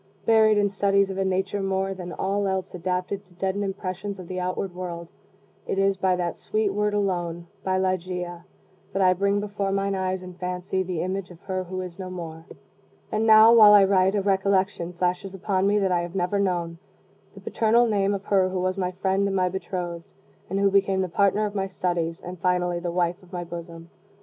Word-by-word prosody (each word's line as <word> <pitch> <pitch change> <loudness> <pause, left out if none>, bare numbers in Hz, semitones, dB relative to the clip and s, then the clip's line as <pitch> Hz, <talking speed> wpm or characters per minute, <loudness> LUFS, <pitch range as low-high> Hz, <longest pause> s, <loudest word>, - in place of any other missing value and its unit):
Buried 220 -1 +5
in 205 0 +3
studies 200 0 +2
of 190 - -4
a - - +2
nature 190 +1 -1
more 195 0 -1
than 180 -2 -7
all 200 +2 -1
else 190 0 -2
adapted 180 +2 -3
to 185 -2 -24
deaden 190 +2 -2
impressions 195 0 -4
of 185 -2 -9
the 185 +1 -4
outward 185 +1 -3
world, 170 -2 -6 0.6
it - - -2
is 195 0 +3
by 190 -1 +1
that 175 -1 -2
sweet 215 -2 -1
word 210 0 0
alone 175 -4 -1 0.2
by 185 0 0
Ligeia 180 -2 -2 0.5
that 195 - 0
I 185 0 +5
bring 200 +2 +1
before 205 -1 -2
mine 195 0 0
eyes 185 -1 -2
in 180 0 -9
fancy 180 +1 -3
the 180 -3 -2
image 185 0 -3
of 175 -2 -13
her 185 -1 -3
who 185 +1 -4
is 180 0 -8
no 185 -1 -5
more. 165 -3 -7 0.7
And 220 +1 0
now, 220 +1 +8
while 215 -3 +9
I 205 -1 +8
write, 190 0 +3
a 200 - 0
recollection 190 -2 +1
flashes 180 +2 -2
upon 195 0 0
me 205 +1 +3
that 195 -2 +1
I 175 -1 +2
have 175 +1 -6
never 190 +2 0
known 175 -4 -1 0.6
the - - -10
paternal 230 +2 +2
name 200 -3 +1
of 200 0 -7
her 190 -2 +3
who 185 0 -2
was 185 +1 -1
my 180 -1 0
friend 190 +2 0
and 195 - -2
my 185 -1 +2
bethrothed, 175 -2 -4 0.5
and 195 +2 -1
who 200 0 +3
became 195 -1 +2
the 185 - -2
partner 200 +4 +2
of 205 - -4
my 195 -2 -1
studies, 175 -3 -2
and 180 0 -7
finally 180 -1 +1
the 175 0 -3
wife 175 +2 0
of 185 -1 -19
my 175 -2 -4
bosom. 170 0 -9
190 Hz, 210 wpm, -25 LUFS, 180-200 Hz, 0.7 s, while